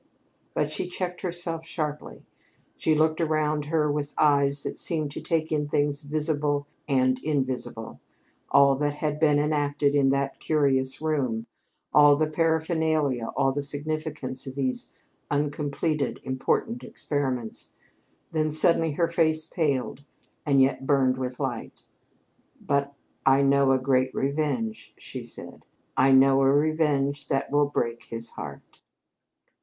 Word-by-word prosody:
But 150 0 0
she 180 - -2
checked 180 0 -4
herself 175 -2 -2
sharply. 155 -3 -5 0.5
She 155 - +1
looked 155 +1 +2
around 155 -2 0
her 150 -1 +1
with 145 0 -3
eyes 140 -1 +3
that - - -5
seemed 155 -4 0
to - - -6
take 160 -1 -1
in 150 -1 0
things 145 0 0
visible 150 -1 -1 0.2
and 130 -2 +2
invisible 130 -6 -3 0.5
all 140 0 +5
that 145 0 -1
had 150 0 -2
been 150 -2 +4
enacted 145 -1 +1
in 140 -2 +3
that 140 0 -1
curious 135 -2 +1
room, 130 -8 -1 0.5
all 145 -1 +7
the 155 +2 +1
paraphernalia, 160 -5 0
all 135 0 +3
the 145 +2 -2
significance 145 -2 -3
of 130 - -7
those 130 -2 -2 0.4
uncompleted, 145 +1 -1
important 130 - -1
experiments. 130 -6 -3 0.6
Then 155 -1 0
suddenly 160 0 +3
her 170 +3 +1
face 160 -1 +1
paled 140 -4 -1 0.4
and 135 -2 +5
yet 135 0 -1
burned 130 -3 +3
with 125 -1 -4
light. 130 -5 -4 0.8
"But 140 0 0 0.3
I 135 +1 +4
know 140 0 +4
a 135 - +4
great 130 0 +1
revenge," 135 -6 -2
she - - -7
said. - - -9 0.3
"I 135 +1 +4
know 135 0 +6
a 135 0 +4
revenge 145 -2 +1
that 135 +1 -1
will 145 0 +3
break 120 -4 -2
his 115 0 -6
heart!" - - -10
145 Hz, 135 wpm, -26 LUFS, 135-155 Hz, 0.8 s, all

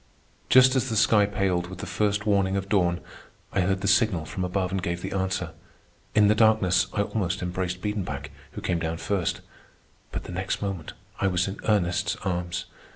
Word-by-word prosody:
Just 130 +1 +7
as 130 0 +1
the 110 - -1
sky 105 -1 +4
paled 95 -3 0
with 95 0 -8
the - - -6
first 105 -1 0
warning 100 -2 +2
of 95 0 -3
dawn, 90 -3 +2 0.5
I 95 - +2
heard 95 +1 0
the 100 - -1
signal 100 -5 +3
from 95 +4 -4
above 90 +1 -1
and 95 -1 -1
gave 85 0 -3
the - - -4
answer. 95 -3 -1 0.6
In 105 -1 +6
the 105 - +5
darkness 110 -4 +4
I 105 - +1
almost 95 -3 -2
embraced 90 0 -3
Biedenbach, 90 -10 -3 0.2
who - - -6
came 85 -2 0
down 80 0 -2
first; 95 -1 -1 0.7
but - - -4
the - - -8
next 95 +2 -2
moment 95 -6 -4 0.3
I 95 - +2
was 90 -1 +1
in 95 +1 -5
Ernest's 100 0 +1
arms. 85 -1 -2
95 Hz, 190 wpm, -26 LUFS, 90-105 Hz, 0.7 s, Just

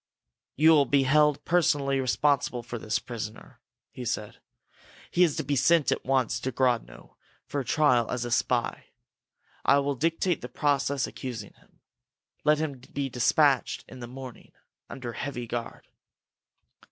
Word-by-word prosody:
"You 160 +3 +6
will 145 -4 +5
be 140 0 +3
held 150 +2 +3
personally 145 -5 +2
responsible 135 -1 +1
for 120 - -6
this 110 0 -1
prisoner," 115 +1 -8 0.3
he 125 +1 -8
said. 110 -3 -4 0.7
"He 175 - +1
is 160 -5 +2
to - - -2
be 140 +1 -1
sent 150 +3 +3
at - - -1
once 125 -3 +1
to 130 - -3
Grodno 120 - -2 0.3
for 140 -1 -3
trial 125 -4 +2
as 125 -1 -2
a 120 - -5
spy. - - 0 0.8
I - - +5
will 140 0 0
dictate 165 +4 0
the 125 - -7
process 140 -1 0
accusing 115 -5 -7
him. - - -28 0.6
Let 150 +1 +4
him 150 -4 -3
be 140 -1 -2
dispatched 135 +1 +2
in - - -11
the 120 - -7
morning, 130 0 -10 0.4
under 120 -3 -6
heavy 125 -1 -5
guard." 115 0 -6
135 Hz, 150 wpm, -27 LUFS, 120-145 Hz, 0.8 s, You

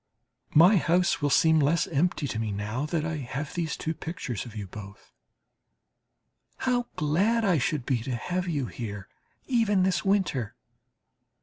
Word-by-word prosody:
My 180 +7 +7
house 175 -1 +2
will 145 - +2
seem 160 +3 +4
less 150 +2 +2
empty 155 -1 0
to 110 - -3
me 110 -2 -2
now 105 +8 -3
that 155 -1 -1
I 160 -1 -2
have 135 +2 -5
these 165 -3 -2
pictures 160 - -4
of 115 - -11
you 105 -2 -5
both. 100 +1 -11 1.4
How 245 -1 0
glad 200 +10 +1
I 180 -6 +3
should 135 0 -1
be 130 -4 +1
to 125 +1 -3
have 180 +9 -3
you 145 -6 -1
here, 105 -5 -6 0.4
even 225 -7 +2
this 185 -1 +1
winter! 190 - 0
155 Hz, 150 wpm, -27 LUFS, 125-180 Hz, 1.4 s, My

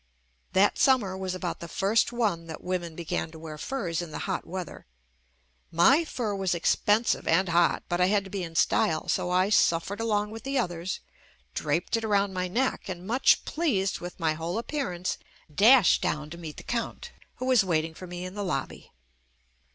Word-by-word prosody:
That 195 +2 +3
summer 235 -9 +3
was 190 -1 -3
about 180 -1 -4
the 170 - -7
first 205 +7 +1
one 205 -9 -1
that 160 - -8
women 175 -3 -3
began 165 -1 -3
to 160 - -12
wear 155 -1 -8
furs 180 - -2
in 175 - -6
the 150 - -5
hot - - -3
weather. 180 - -7 0.8
My 265 - +5
fur 230 -8 -3
was 190 -3 0
expensive 210 +6 +2
and 180 +3 +3
hot, 170 0 +3
but 175 - 0
JUST 180 0 +3
ME - - +1
I - - +3
had 200 - +2
to 195 - -11
be 200 - -3
in 165 -2 -6
style 160 -1 +2
so - - 0
I 185 +2 +2
suffered 195 +2 +2
along 210 -2 0
with 225 0 -7
the 275 +1 -2
others, 175 -5 -2 0.5
draped 160 - 0
it 225 - -4
around 200 -2 +1
my 185 0 -1
neck 235 +1 -1
and 180 -1 -6
much 245 +6 +3
pleased 220 - 0
with 175 +1 -8
my 160 -2 +1
whole 165 +4 -3
appearance 230 - -3 0.3
dashed 220 - +6
down 150 0 -2
to 170 - -7
meet 160 -3 -8
the - - -9
Count, 235 -1 -4 0.2
who 255 - -5
was 255 -5 +4
waiting 165 -3 0
for 185 +3 -10
me 175 +1 -6
in 185 - -7
the 205 - -5
lobby. 140 -8 -4
185 Hz, 200 wpm, -27 LUFS, 170-215 Hz, 0.8 s, dashed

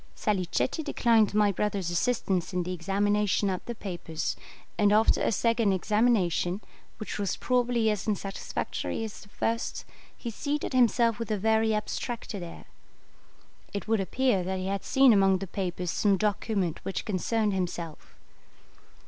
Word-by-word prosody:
Salicetti 205 - 0
declined 230 -8 +3
my 210 -1 +4
brother's 195 -2 -1
assistance 190 -2 0
in 180 -1 0
the 180 +1 -3
examination 200 +3 +1
of 185 - -4
the 240 - -5
papers, 175 -6 -4 0.4
and 205 -1 +3
after 215 +2 +4
a - - +2
second 230 -1 +2
examination, 195 -3 +1 0.4
which 215 - -5
was 200 -2 -1
probably 245 -2 +1
as 210 0 -3
unsatisfactory 205 +2 -3
as 220 -2 -7
the 205 - -15
first, 230 +3 -2 0.3
he 235 - -5
seated 290 +5 -3
himself 235 -2 +3
with 230 - -4
a 215 - 0
very 220 +2 +2
abstracted 210 -1 -4
air. 170 -1 -9 1.1
It 200 - -4
would 225 -1 +2
appear 215 0 +1
that 190 +1 -2
he 185 - -4
had 195 0 -2
seen 270 -3 +5
among 195 -2 +4
the 195 - -5
papers 180 -2 -3
some 200 -2 +2
document 200 -4 -1
which 195 - -3
concerned 210 +2 0
himself. 175 -4 -4
205 Hz, 150 wpm, -28 LUFS, 185-225 Hz, 1.1 s, seen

